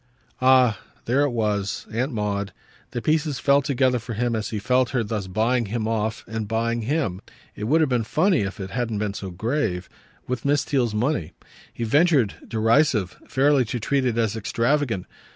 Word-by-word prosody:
Ah 130 -5 +5 0.3
there 135 +5 +3
she - - -1
was, 105 -5 -1
Aunt 125 +6 -1
Maud! 105 -3 -2 0.4
The 120 - -5
pieces 155 -2 +1
fell 140 +1 +3
together 130 -2 +1
for 115 0 -6
him 120 +1 0
as 110 -1 -2
he 110 - -3
felt 125 +3 +2
her 125 -3 0
thus 105 -2 -3
buying 115 +4 +1
him 110 +1 -2
off, 110 0 -2
and 110 -1 -4
buying 115 +2 0
him 115 - -1 0.3
it 105 - -5
would 155 +8 +3
have 155 - +2
been 120 -2 +2
funny 165 - +2
if 100 +1 -4
it 95 -1 -6
hadn't 120 -4 -2
been 105 -1 -2
so 100 -1 -6
grave 95 -1 -2 0.4
with 125 -2 -3
Miss 145 0 +2
Theale's 120 -6 0
money. 105 - -1 0.4
He 120 - -5
ventured, 140 - +3
derisive, 115 - +2
fairly 140 0 +3
to 120 +2 -3
treat 135 +4 0
it 120 -3 0
as 115 -2 +1
extravagant. 115 -1 0
115 Hz, 185 wpm, -24 LUFS, 105-135 Hz, 0.4 s, Ah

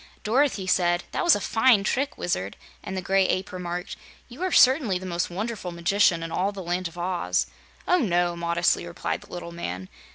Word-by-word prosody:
Dorothy 240 -3 +1
said: 175 -2 +2
"That - - -1
was 345 - +6
a - - -2
fine 225 0 +3
trick, 275 +8 -1
Wizard!" 100 - -2 0.2
and 190 - -6
the 185 - -3
Gray 195 0 +3
Ape 185 - -1
remarked: 180 0 -5 0.3
"You 250 +7 -11
are 370 0 0
certainly 260 - +5
the 185 - -8
most 175 -1 -2
wonderful 200 0 -4
magician 170 0 +2
in 165 - -5
all 190 +4 0
the 195 -2 -7
Land 175 +1 -2
of 170 - -13
Oz!" 175 0 0 0.4
"Oh, 360 - +4
no," 175 - +1
modestly 170 0 +1
replied 170 +1 -4
the - - -17
little 175 -1 -6
man. 95 - -6
185 Hz, 195 wpm, -25 LUFS, 175-210 Hz, 0.4 s, was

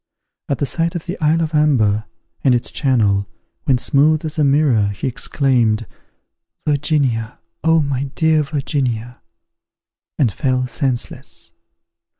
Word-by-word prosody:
At 140 - 0
the 145 - -1
sight 165 +4 0
of 170 - -4
the 180 +1 -4
isle 160 +2 +2
of 160 0 -4
Amber, 115 -9 +2 0.4
and 130 -3 +4
its 120 - 0
channel, 105 -8 +1 0.4
when 130 - +3
smooth 150 +5 +2
as 155 0 -3
a - - +4
mirror, 135 -7 +3
he 100 +4 -5
exclaimed, 120 -4 +1 0.8
"Virginia! 140 -6 0 0.3
oh 160 0 +4
my 140 -1 -2
dear 160 -1 +3
Virginia!" 130 -5 -3 1.0
and 120 -8 +2
fell 130 -3 0
senseless. 125 0 -4
135 Hz, 130 wpm, -19 LUFS, 120-150 Hz, 1.0 s, and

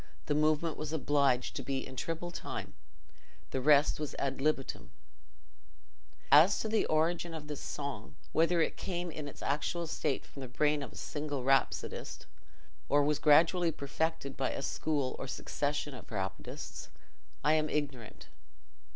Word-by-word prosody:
The 150 - +1
movement 155 +2 +2
was 155 0 -4
obliged 140 -5 +2
to - - -2
be 135 +1 -2
in 130 - -9
triple 165 +5 -3
time; - - -5 0.8
the 130 - -1
rest 145 +2 +5
was 150 -2 -4
ad 135 -1 -2
libitum. 145 -2 -1 1.4
As 160 +7 +8
to - - -2
the 220 0 +2
origin 165 +2 +1
of 155 -2 -7
this 150 -1 -6
song—whether 150 - -1
it - - -2
came 175 -2 -3
in 150 -1 -6
its 145 - -9
actual 165 +4 -1
state 155 -3 -1
from 140 - -11
the 130 - -5
brain 150 +4 +1
of 140 - -7
a - - -12
single 145 -3 -3
rhapsodist, 135 +1 0 0.6
or 145 0 +5
was 150 0 +1
gradually 165 +3 +5
perfected 150 0 -2
by 135 - 0
a - - -4
school 145 -4 -1
or 135 - -4
succession 145 +2 -2
of 125 - -10
rhapsodists, 95 -3 -5 0.5
I 150 +2 +4
am 155 -1 +2
ignorant. 140 -7 -3
150 Hz, 150 wpm, -32 LUFS, 135-160 Hz, 1.4 s, As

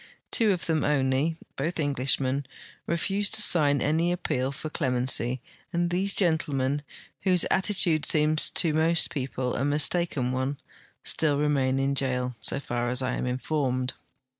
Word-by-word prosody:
Tavo 220 -3 +3
of 180 -3 -2
them 160 -3 0
only, 140 +2 +1 0.2
both 165 +5 -3
Englishmen, 135 -1 +1 0.4
refused 195 +5 0
to - - +2
sign 145 -7 +3
any 165 +4 +1
appeal 135 -6 -1
for 155 +2 -7
clemency, 125 -3 0 0.3
and 175 -1 0
these 195 +3 0
gentlemen, 145 -6 +1 0.4
Avhose 185 -3 +3
attitude 180 -6 +1
seems 155 0 +3
to 160 -3 +2
most 160 +2 +2
jAeople 130 -2 -3
a 135 - -1
mistaken 145 -2 +1
one, 130 +2 -2 0.5
still 150 -3 +2
remain 140 -3 +1
in 135 +1 0
jail, 125 -2 0
so - - +1
far 120 -3 -3
as 125 +1 0
I 130 0 -1
am - - -2
informed. 130 -1 -1
145 Hz, 145 wpm, -26 LUFS, 130-165 Hz, 0.5 s, Tavo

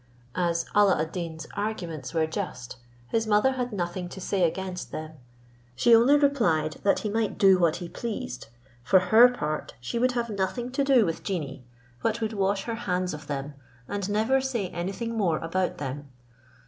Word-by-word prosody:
As 170 -1 0
Alla 205 -4 +5
ad 160 +1 -2
Deen's 165 -3 -5
arguments 170 -10 -4
were 160 -1 +1
just, 155 - -5 0.3
his 225 -1 0
mother 210 +5 +4
had 250 -2 -3
nothing 175 -2 -3
to 190 - -9
say 190 +1 -1
against 185 +1 -5
them; 155 0 -5 0.6
she 230 - +6
only 250 +6 +6
replied, 190 - +2
that 200 - +2
he 215 - -2
might 220 -1 -1
do 190 -2 +6
what 170 -3 +3
he 175 -1 -6
pleased, 205 - -5 0.3
for 130 +10 +4
her 220 +7 +7
part, 155 -11 -4
she 125 - -3
would 250 +1 +2
have 235 -2 -2
nothing 210 +5 -2
to 275 +2 0
do 265 -5 +5
with 165 -2 -3
genii, 145 -9 -4 0.4
but 225 0 0
would 220 -1 -2
wash 195 -1 0
her 230 - -3
hands 185 -5 -2
of 150 -1 -8
them, 145 0 -4 0.3
and 200 -1 -3
never 220 +6 +2
say 240 -8 -2
anything 195 +7 -4
more 180 -8 +1
about 180 +3 -1
them. 145 +1 -5
190 Hz, 180 wpm, -27 LUFS, 165-225 Hz, 0.6 s, her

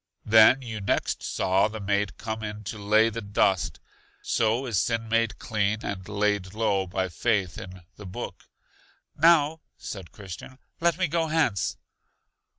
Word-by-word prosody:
Then 110 +5 +6
you 110 -4 -5
next 100 - 0
saw 95 +2 +1
the 110 0 -7
maid 100 -1 -1
come 110 0 -4
in 105 0 -6
to 105 +2 -6
lay 110 +2 +4
the 115 +1 -5
dust; 100 -2 +1 0.4
so 115 +3 +1
is 110 -7 0
sin 115 -1 -1
made 115 -2 +1
clean 105 -1 0
and 95 -2 -5
laid 100 -2 0
low 100 -4 +1
by 95 +1 -1
faith 95 -1 -1
in 95 -1 -10
The 105 - -9
Book. 90 - -7 0.7
Now, 160 0 +4 0.2
said 95 -5 -8
Christian, 100 +6 -10 0.2
let 170 -1 +2
me 185 -1 +1
go 165 +1 0
hence. 155 - 0
105 Hz, 155 wpm, -26 LUFS, 100-115 Hz, 0.7 s, Then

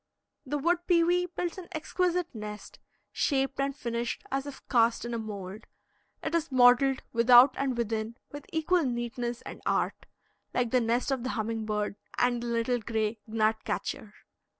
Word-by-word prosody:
The 295 +3 -1
wood 340 +4 +2
pewee 350 +1 +3
builds 355 +1 -4
an 355 - -9
exquisite 350 +2 -1
nest, 210 -2 -8 0.3
shaped 270 -1 0
and 275 0 0
finished 235 -2 -3
as 270 +1 -1
if 280 - -10
cast 235 -2 +3
in 240 - -4
a 230 - -1
mould. 205 -1 -7 0.6
It - - -3
is 330 -3 0
modeled 255 +1 +5
without 245 +3 +7
and 265 -3 -1
within 225 0 -2
with 290 0 -9
equal 325 +2 +2
neatness 240 -1 -3
and - - -9
art, - - -1 0.5
like 245 -2 +1
the 255 - +4
nest 235 +4 0
of 265 -2 0
the 255 - -3
humming 220 0 -2
bird 210 -1 -2 0.2
and 245 -1 +2
the 240 - -4
little 235 +1 0
gray 220 -1 -2
gnat 220 0 +1
catcher. 210 -1 -4
245 Hz, 165 wpm, -29 LUFS, 225-280 Hz, 0.6 s, without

